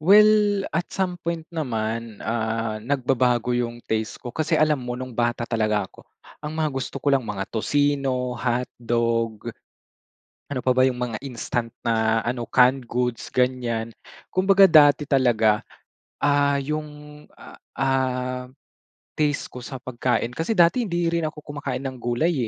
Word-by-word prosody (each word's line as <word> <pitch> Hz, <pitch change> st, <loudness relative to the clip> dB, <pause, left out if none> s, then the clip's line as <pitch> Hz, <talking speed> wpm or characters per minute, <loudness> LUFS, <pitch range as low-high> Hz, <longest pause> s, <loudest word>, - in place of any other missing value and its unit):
Well 205 Hz, +2 st, +5 dB
at 175 Hz, +2 st, -1 dB
some 180 Hz, -2 st, -2 dB
point 170 Hz, -1 st, -3 dB
naman, 115 Hz, -7 st, -3 dB
ah, 110 Hz, -1 st, -2 dB
nagbabago 125 Hz, -1 st, +1 dB
yung 120 Hz, -1 st, -2 dB
taste 110 Hz, 0 st, -2 dB
ko 120 Hz, -1 st, -8 dB
kasi 155 Hz, -, 0 dB
alam 155 Hz, -2 st, +2 dB
mo 125 Hz, 0 st, -4 dB
nung 130 Hz, 0 st, -6 dB
bata 120 Hz, 0 st, 0 dB
talaga 110 Hz, -3 st, 0 dB
ako, -, -, -16 dB, 0.3 s
ang 150 Hz, 0 st, -5 dB
mga 160 Hz, -1 st, +1 dB
gusto 135 Hz, -1 st, -4 dB
ko 140 Hz, -, 0 dB
lang 135 Hz, -, +4 dB
mga 105 Hz, -3 st, -3 dB
tocino, 135 Hz, 0 st, 0 dB
hotdog. 115 Hz, -2 st, -1 dB, 1.0 s
Ano 130 Hz, -, -1 dB
pa 130 Hz, -, +2 dB
ba 130 Hz, -, +5 dB
yung 125 Hz, -2 st, 0 dB
mga 120 Hz, -3 st, -2 dB
instant 120 Hz, -2 st, -3 dB
na 110 Hz, 0 st, +1 dB
ano, 120 Hz, +1 st, -3 dB
canned 130 Hz, +2 st, +3 dB
goods 125 Hz, 0 st, -2 dB
ganiyan. 125 Hz, -3 st, 0 dB, 0.4 s
Kumbaga 195 Hz, +1 st, +5 dB
dati 150 Hz, -3 st, +6 dB
talaga, 115 Hz, -5 st, +3 dB, 0.6 s
ah, 145 Hz, 0 st, +3 dB
yung, 150 Hz, +1 st, -6 dB, 0.2 s
a -, -, -12 dB, 0.2 s
ah, 130 Hz, -1 st, 0 dB, 0.8 s
taste 150 Hz, -2 st, +1 dB
ko 125 Hz, -, -9 dB
sa 130 Hz, -, -6 dB
pagkain 125 Hz, -1 st, -1 dB
kasi 165 Hz, -, -1 dB
dati 170 Hz, +9 st, +5 dB
hindi 175 Hz, -2 st, -1 dB
rin 170 Hz, 0 st, 0 dB
ako 155 Hz, 0 st, -7 dB
kumakain 145 Hz, -3 st, -5 dB
ng 130 Hz, -1 st, -5 dB
gulay 120 Hz, +9 st, +1 dB
125 Hz, 145 wpm, -24 LUFS, 120-150 Hz, 1.0 s, dati